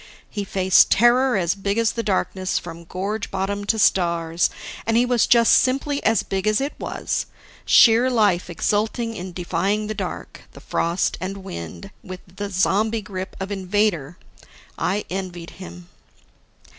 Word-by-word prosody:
He 205 - -3
faced 190 -1 +4
terror 245 +2 +4
as 175 -2 +1
big 200 +1 -2
as 230 -1 +2
the 230 - -3
darkness 190 -2 -1
from 170 -1 -7
gorge 195 +5 -4
bottom 200 +1 -3
to 220 +2 +1
stars, 170 -4 +2 0.4
and 225 0 +2
he 245 - +4
was 245 -2 +2
just 235 -1 +5
simply 275 +2 +1
as 225 +1 +2
big 195 +1 -3
as 215 0 +3
it 280 +2 -2
was - - -3 0.4
sheer 235 +2 +6
life 205 -8 +2
exulting 220 +6 -1
in 180 -1 -6
defying 185 +4 -1
the 215 - -3
dark, 195 -4 -6
the - - -12
frost 170 +2 -1
and 195 +1 -5
wind 85 - -8
and 185 0 -8
the 200 +3 -7
zombie 210 +3 +1
grip 185 -1 -6
of 190 +1 -5
Invader. 185 -5 -1 0.6
I 200 +3 -1
envied 180 -3 -5
him. 85 +1 -10
195 Hz, 155 wpm, -22 LUFS, 180-220 Hz, 0.6 s, sheer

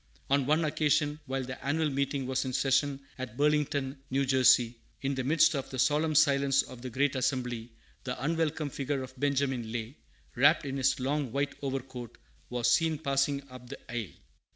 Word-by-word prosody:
On 140 -2 +3
one 155 +2 +3
occasion, 150 0 +1
while 135 0 -2
the 130 0 -7
annual 150 +2 0
meeting 140 0 -1
was 130 0 0
in 130 -1 -4
session 135 +1 +1 0.2
at 125 -2 -6
Burlington, 145 -2 +1
N. 135 +1 +1
J., 125 -2 +4 0.3
in 135 +1 0
the 130 -1 -2
midst 160 +4 +4
of 135 -3 -3
the 130 - -6
solemn 150 +4 +2
silence 140 -2 +4
of 125 -2 -11
the 130 - -5
great 135 +3 +1
assembly, 125 -3 -2 0.3
the 125 -1 -4
unwelcome 160 -1 -1
figure 135 0 -2
of 130 0 -9
Benjamin 135 -5 0
Lay, 115 +3 -4 0.4
wrapped 145 +5 +4
in 135 0 -3
his 135 0 +2
long 135 0 -1
white 140 +2 -1
overcoat, 130 -3 -5 0.3
was 120 -1 0
seen 160 +6 +3
passing 140 -1 0
up 125 -1 -11
the 140 - -7
aisle. 115 -6 -4
135 Hz, 175 wpm, -30 LUFS, 130-145 Hz, 0.4 s, J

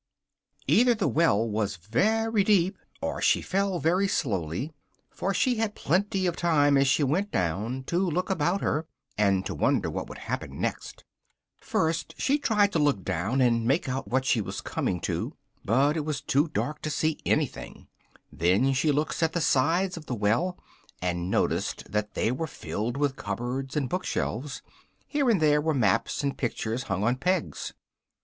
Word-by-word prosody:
Either 245 +1 +4
the 210 - 0
well 115 -9 +3
was 105 -2 -1
very 210 - +1
deep, 190 -2 +3 0.3
or - - -2
she - - +4
fell 195 -1 0
very 180 +4 +2
slowly, 105 - -2 0.4
for 195 - -2
she 245 +5 +1
had 220 -2 -1
plenty 190 +4 0
of 175 -2 0
time 145 -4 +3
as 135 0 +4
she 140 +2 +3
went 175 +10 +1
down 105 +9 -1
to 170 +6 -1
look 185 +1 0
about 180 +2 +1
her, 155 +2 -1 0.3
and 100 -2 +2
to 95 - -3
wonder 75 - +1
what - - -4
would - - -8
happen - - -5
next. - - -4 0.5
First, 160 +1 -1
she 285 +2 +1
tried 210 -7 +3
to 165 - +1
look 145 -10 +2
down 105 +13 0
and 115 -2 +3
make 135 +4 +2
out 130 +1 -3
what 130 +1 0
she 120 -4 +2
was 100 - -5
coming 90 - -2
to, - - -3 0.3
but 135 +8 +3
it 155 - -1
was 150 -2 -2
too 145 +4 +1
dark 150 -1 -3
to 155 - -3
see 155 +1 0
anything: - - -2 0.4
then, 95 +11 +2
she 150 +3 +2
looked 150 +4 -1
at 160 0 +2
the 175 - 0
sides 170 +6 +2
of 155 - -10
the 125 - -2
well, 115 - +1 0.4
and 90 0 -2
noticed - - -1
that 105 +1 -2
they 115 - +1
were 160 +6 -2
filled 120 -3 -4
with 140 -2 0
cupboards 130 +3 -3
and 140 -3 0
book 180 +8 -2
shelves: 135 +5 -3 0.4
here 285 -4 +1
and 215 -5 +4
there 150 -1 +4
were 160 0 0
maps 115 +2 +1
and 140 -1 -2
pictures 120 0 -2
hung 95 +1 0
on 120 +3 +2
pegs. 180 +5 -1
145 Hz, 180 wpm, -27 LUFS, 115-180 Hz, 0.5 s, Either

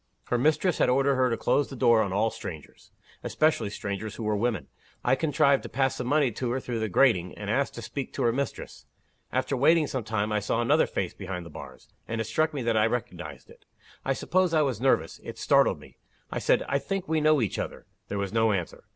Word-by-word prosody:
Her 120 - +2
mistress 155 +6 +2
had - - +3
ordered 135 +2 +3
her 130 -1 +2
to 115 - -1
close 145 - +1
the 135 - -7
door 115 -2 +4
on 100 - -1
all 110 +4 +1
strangers 80 -5 -9 0.3
especially 155 -9 +1
strangers 100 +1 -5
who 115 - -6
were 105 0 0
women. 105 - -1 0.4
I - - +3
contrived 140 -1 +3
to - - -8
pass 135 -1 0
some 125 - -4
money 145 -2 +3
to 120 +3 -3
her 125 +2 -1
through 120 -3 -4
the 110 -1 -1
grating, 90 -5 +2
and - - -3
asked - - 0
to - - -7
speak - - -5
to - - -2
her 115 - +3
mistress. 140 +2 -5 0.4
After 140 - 0
waiting 155 +5 +4
some 130 -4 -3
time, 110 -1 -1
I 105 - +1
saw 105 +3 -1
another 120 - +3
face - - -3
behind 90 -2 -6
the 85 - -11
bars - - -11 0.2
and 115 0 -3
it - - +1
struck 155 +9 0
me 140 -4 -4
that 115 -1 +1
I 110 0 +4
recognized 90 - -5
it. - - -18 0.4
I 135 - +1
suppose 180 +4 +1
I 155 - +4
was 130 -6 -2
nervous. 125 -12 +1
It - - -8
startled - - +3
me. - - -17 0.3
I - - -2
said, - - +2
'I 140 - +1
think 195 +3 -3
we 160 0 +1
know 155 -1 +4
each 110 -6 -1
other.' - - -5 0.2
There 100 - -4
was 100 0 -3
no 115 -1 +3
answer. 90 -4 -4
120 Hz, 235 wpm, -27 LUFS, 105-140 Hz, 0.4 s, door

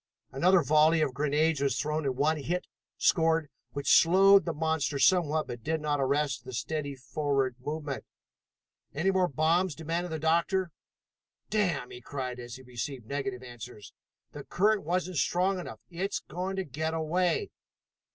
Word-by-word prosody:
Another 175 +6 +4
volley 155 +2 +4
of 145 -4 0
grenades 150 +2 +1
was 140 -1 +1
thrown 150 0 -1
and 130 -2 -1
one 155 +3 +2
hit 175 +5 -2 0.3
scored, 160 -3 +2 0.2
which 140 0 +5
slowed 195 +3 +6
the 170 - -1
monster 160 -2 -1
somewhat 155 -1 +3
but 120 -1 -7
did 160 +3 -1
not 150 -2 -1
arrest 135 -2 0
the 130 0 -9
steady 145 +2 -3
forward 135 -1 -1
movement. 150 +1 -4 0.9
"Any 180 +7 +2
more 185 -1 +2
bombs?" 165 +3 +1
demanded 165 +2 -3
the 160 - -2
doctor. 170 +3 +1 0.8
"Damn!" 180 -12 0
he 125 - -9
cried 125 -2 -5
as 120 0 -8
he 130 - -12
received 125 0 -6
negative 135 -1 -4
answers. 120 -3 -10 0.4
"The 145 - -8
current 200 +9 +1
wasn't 180 +1 -1
strong 185 +5 +1
enough. 110 -11 -8
It's 190 +4 -2
going 185 +2 -5
to 190 - -1
get 160 +2 -3
away." 175 - 0
155 Hz, 155 wpm, -29 LUFS, 135-175 Hz, 0.9 s, slowed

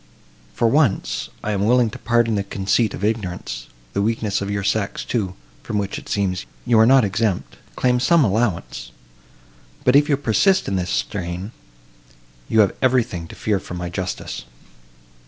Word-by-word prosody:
For 115 - +2
once, 135 -4 +1
I 105 - -1
am 100 -1 0
willing 120 -1 +4
to - - -9
pardon 120 -1 +2
the 100 -1 0
conceit 100 +3 0
of - - -8
ignorance; 90 - -3 0.3
the - - 0
weakness 110 -1 0
of 100 - -3
your 100 -1 -2
sex, 100 0 -1
too, 95 -6 -2 0.3
from 110 - -3
which, 100 -1 -2
it - - -14
seems, 95 -3 -1 0.2
you 120 -2 +4
are 110 - +6
not 135 -1 +6
exempt, 95 - -1 0.2
claims 125 0 +2
some 170 +2 +5
allowance; 100 - -1 0.9
but, 125 - +4
if 145 +1 +5
you 140 - +3
persist 145 - +2
in 100 - -1
this 90 -1 -1
strain—you - - -4
have 100 - +2
everything 120 -10 +1
to - - -11
fear 105 -3 0
from 90 - -8
my 90 0 -4
justice." 95 +1 -5
100 Hz, 165 wpm, -21 LUFS, 90-120 Hz, 0.9 s, are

